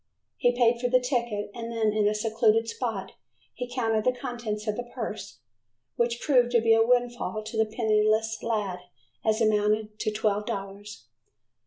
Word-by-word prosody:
He 245 0 +2
paid 235 -1 +3
for 245 - +1
the 255 +1 +5
ticket 240 -5 -2
and 230 -1 -6
then 220 -2 +1
in 210 -1 +2
a 210 - +1
secluded 225 +1 +2
spot 225 -5 -3 0.4
he 250 - -5
counted 225 -3 0
the 255 - +3
contents 235 -5 -4
of 215 -1 -1
the 240 +1 -6
purse, 215 -4 -5 0.6
which 235 0 0
proved 250 -5 +3
to 235 - +6
be 225 0 +4
a 225 0 +5
windfall 240 -2 0
to 220 +2 -8
the 220 0 +2
penniless 220 0 +1
lad, 210 -5 -2 0.4
as 220 +1 +1
it - - +5
amounted 210 +1 0
to - - 0
twelve 210 -1 0
dollars. 200 - -6
225 Hz, 175 wpm, -27 LUFS, 210-240 Hz, 0.6 s, to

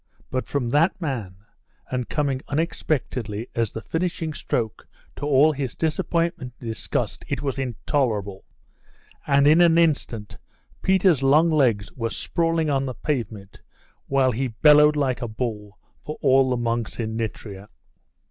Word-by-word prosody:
But 130 0 -2
from 130 -5 -1
that 165 +8 +2
man, 120 - -4 0.6
and 125 -2 -2
coming 140 -4 -1
unexpectedly 130 -8 -2
as 115 -3 -1
the 110 - -7
finishing 165 - -2
stroke 115 -6 -3 0.3
to 145 - -4
all 145 +2 +5
his 135 -4 -4
disappointment 165 -4 -1
and 115 - -6
disgust, 100 -7 -3
it - - -3
was 135 -1 -2
intolerable; 115 -6 -2 0.8
and 140 0 +4
in 155 +4 +6
an 170 -1 +5
instant 140 -10 0 0.4
Peter's 190 -6 +3
long 150 +5 +4
legs 120 -10 +2
were 115 -2 -3
sprawling 165 +4 0
on 135 -2 0
the 130 - -5
pavement, 110 -8 -4 0.5
while 135 -2 +3
he 130 +3 -1
bellowed 150 +6 +5
like 135 -3 0
a 120 - -2
bull 105 -2 -5 0.3
for 150 - -6
all 135 -1 +4
the 125 - 0
monks 115 -1 -2
in 110 -1 -2
Nitria. 105 -3 -5
135 Hz, 145 wpm, -24 LUFS, 115-150 Hz, 0.8 s, in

